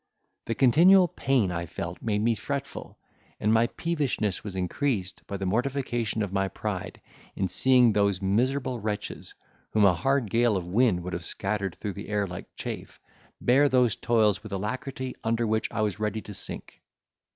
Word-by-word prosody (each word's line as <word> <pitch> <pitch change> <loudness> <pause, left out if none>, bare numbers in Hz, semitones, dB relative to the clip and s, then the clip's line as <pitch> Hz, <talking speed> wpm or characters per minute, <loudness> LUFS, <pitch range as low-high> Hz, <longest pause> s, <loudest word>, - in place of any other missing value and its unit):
The 115 - -2
continual 175 - +6
pain 125 -12 +1
I 85 -1 -3
felt 85 +2 -6
made 105 -2 0
me 115 +1 +3
fretful, 140 +4 -5 0.4
and 105 +1 +2
my 115 +1 +4
peevishness 140 - -2
was 100 -3 -6
increased 95 0 -1
by 100 - -4
the 95 - -4
mortification 120 0 -1
of 100 -2 -5
my 95 0 +1
pride - - -5 0.4
in 95 - 0
seeing 125 +5 +4
those 100 -2 +2
miserable 125 +6 0
wretches, 105 -1 -5 0.4
whom 105 -2 +5
a 95 - +6
hard 125 +6 0
gale 115 -3 +3
of 90 - -4
wind 95 -1 +2
would 90 - -5
have 85 - -4
scattered 95 +1 -2
through 105 - -5
the 100 - -8
air 105 -1 +1
like 90 -2 -7
chaff, - - -6 0.4
bear 140 +4 +4
those 125 -5 +3
toils 110 -4 +2
with 110 -1 -10
alacrity 130 +6 -4
under 115 +1 +1
which 110 0 0
I 115 - -2
was 105 -2 -1
ready 110 0 -2
to 105 - -9
sink. - - -6
110 Hz, 175 wpm, -27 LUFS, 100-125 Hz, 0.4 s, continual